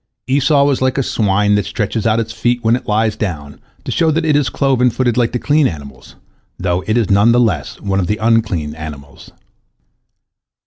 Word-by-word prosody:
Esau 140 +2 +3
was 140 -2 0
like 130 0 0
a 135 - +1
swine 105 -2 +1
that 105 0 +2
stretches 110 -1 -2
out 110 +1 +2
its 115 -1 -4
feet 120 +1 -1
when 115 +1 +3
it 125 - -7
lies 110 +1 +1
down, 75 -8 -5 0.2
to - - -5
show 165 - +1
that 160 +1 0
it 150 -2 +2
is 145 -4 +1
cloven 130 -1 +1
footed 120 0 -1
like 120 -2 +1
the - - -1
clean 145 +3 +2
animals, 70 - -9 0.4
though 90 0 -1
it 110 +2 +1
is 110 -4 0
none 100 +4 +4
the 120 - +3
less 100 -12 -1
one 100 -1 -1
of 90 - -1
the 105 - -1
unclean 110 -9 0
animals. 75 -3 -10
110 Hz, 205 wpm, -16 LUFS, 95-125 Hz, 0.4 s, none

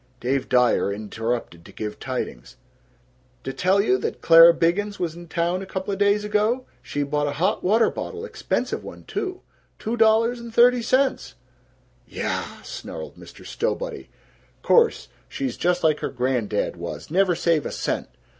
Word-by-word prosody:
Dave 130 +2 -1
Dyer 125 -5 +3
interrupted 110 -3 -4
to - - -14
give 105 -1 -6
tidings, 125 - -5 0.9
"D' 135 - -3
tell 190 +2 +2
you 130 -10 +2
that - - -3
Clara 165 +1 +8
Biggins 195 +5 0
was 170 -3 -2
in 175 0 -11
town 170 +3 -1
couple 190 +1 -3
days 200 +1 +2
ago? 215 +5 0 0.2
She 145 - -3
bought 145 +1 -1
a 145 - -2
hot 175 - 0
water 220 +5 +3
bottle 445 0 -6
expensive - - -2
one, - - -10
too 370 -1 -4 0.4
two 225 +2 -3
dollars 225 +1 +3
and 235 0 -9
thirty 245 +1 +5
cents!" 260 +3 0 0.8
"Yaaaaaah!" - - -4
snarled - - -7
Mr. - - -14
Stowbody. - - -3 0.6
"Course. 470 -1 +3 0.2
She's 270 -2 -3
just 180 0 0
like 155 -2 +3
her - - -3
grandad 125 -7 -1
was. 85 - -7
Never 185 0 +3
save 165 -3 +1
a - - -6
cent. - - -3
180 Hz, 155 wpm, -23 LUFS, 135-225 Hz, 0.9 s, Clara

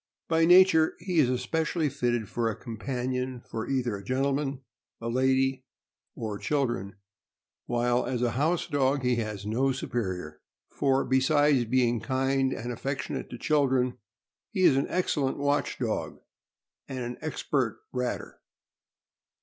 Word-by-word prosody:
By 165 0 +3
nature 175 -2 +6
he 175 -1 -1
is 135 -5 +4
especially 155 +6 0
fitted 120 -4 -1
for 115 +1 -1
a 110 - -3
companion 125 +2 -3
for 110 -1 -6
either 125 -5 0
a 100 - -8
gentleman, 135 +3 -1 0.4
a 115 - -4
lady, 130 +1 +2 0.5
or 105 -3 -4
children, 120 -9 -1 0.7
while 120 0 +1
as 125 -1 -1
a 120 - +2
house 155 +8 +1
dog 140 -2 +1
he 125 -1 +2
has 105 -3 -4
no 125 +6 +1
superior; 95 - -4 0.3
for, 135 -1 +1
besides 135 0 +3
being 120 0 +2
kind 135 +1 +1
and 120 0 -4
affec 135 +4 -3
tionate - - -5
to 120 - -7
children, 130 -3 +1 0.5
he 185 - -1
is 140 - +6
an 135 - +1
excellent 150 -7 0
watch 145 0 0
dog - - -2 0.7
and 135 - -5
an 120 +1 -5
expert 140 -6 -1
ratter. 125 -1 -3
130 Hz, 140 wpm, -28 LUFS, 120-140 Hz, 0.7 s, nature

